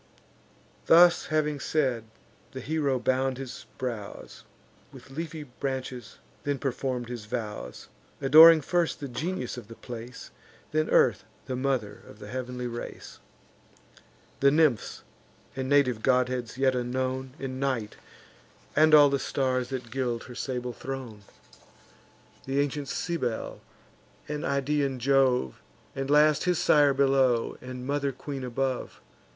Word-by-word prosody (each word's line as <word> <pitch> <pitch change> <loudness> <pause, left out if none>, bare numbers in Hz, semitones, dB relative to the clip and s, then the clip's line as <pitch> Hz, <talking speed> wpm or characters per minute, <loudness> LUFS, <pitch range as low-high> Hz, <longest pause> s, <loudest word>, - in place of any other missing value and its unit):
Thus 175 +1 +6
having 150 -2 0
said, 130 -8 0 0.5
the 130 - -6
hero 145 -2 0
bound 130 +1 0
his 130 -2 -8
brows 115 -6 -6 0.5
With - - -14
leafy 160 +1 -5
branches, 130 -1 -5 0.2
then 145 -1 -1
perform'd 130 -2 -3
his 120 -3 -7
vows; 105 - -6 0.3
Adoring 155 +4 +8
first 175 +3 0
the 140 - -5
genius 130 0 -4
of 120 - -9
the 115 - -11
place, 120 +1 -9 0.4
Then 155 0 0
Earth, - - +3 0.2
the 130 - -3
mother 125 -6 -2
of - - -13
the 105 -1 -10
heav'nly 125 0 -5
race, 120 -1 -7 1.2
The 140 - +5
nymphs, 150 -7 +1 0.5
and 130 0 -3
native 130 -6 +3
godheads 125 -1 0
yet 135 -1 +3
unknown, 130 +1 -2
And 130 -2 -5
Night, 130 -6 -2 0.8
and 155 +1 +6
all 145 -2 +7
the 140 - +1
stars 130 -3 -1
that 130 -4 -5
gild 120 -2 -2
her 125 - -10
sable 125 0 -4
throne, 130 -5 -7 1.3
And 135 +1 -1
ancient 145 0 -1
Cybel, 130 -10 -3 0.7
and 150 0 -4
Idaean 140 -1 0
Jove, 130 - +2 0.3
And 135 0 -3
last 150 +1 +4
his 180 -1 +2
sire 145 -3 +4
below, 135 -4 +2
and 125 0 -7
mother 140 0 -1
queen 135 +1 -7
above. 130 +1 -3
130 Hz, 130 wpm, -27 LUFS, 125-145 Hz, 1.3 s, Adoring